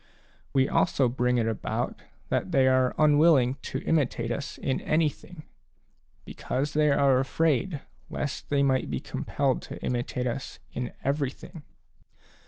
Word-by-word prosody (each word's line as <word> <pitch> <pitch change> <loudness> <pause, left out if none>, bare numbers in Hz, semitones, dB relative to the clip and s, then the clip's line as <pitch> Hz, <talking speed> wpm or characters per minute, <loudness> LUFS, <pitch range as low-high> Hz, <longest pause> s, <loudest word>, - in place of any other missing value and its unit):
We 135 -1 +3
also 135 - +2
bring 125 0 +1
it 115 - +1
about 110 - -3 0.3
that 185 - -1
they 135 -5 +4
are 130 -1 +3
unwilling 150 -4 +4
to 135 - -5
imitate 125 -7 0
us 140 +3 -4
in 130 - -2
anything, 155 +1 -1 0.8
because 140 +3 -3
they 150 0 +3
are 140 -2 +4
afraid 155 +3 0 0.3
lest 145 - -4
they 140 -1 +2
might 130 - +1
be 65 -3 -2
compelled - - -1
to - - -7
imitate 125 0 -2
us 125 +2 -4 0.2
in 125 -1 -4
everything. 145 +4 -3
135 Hz, 135 wpm, -27 LUFS, 125-150 Hz, 0.8 s, they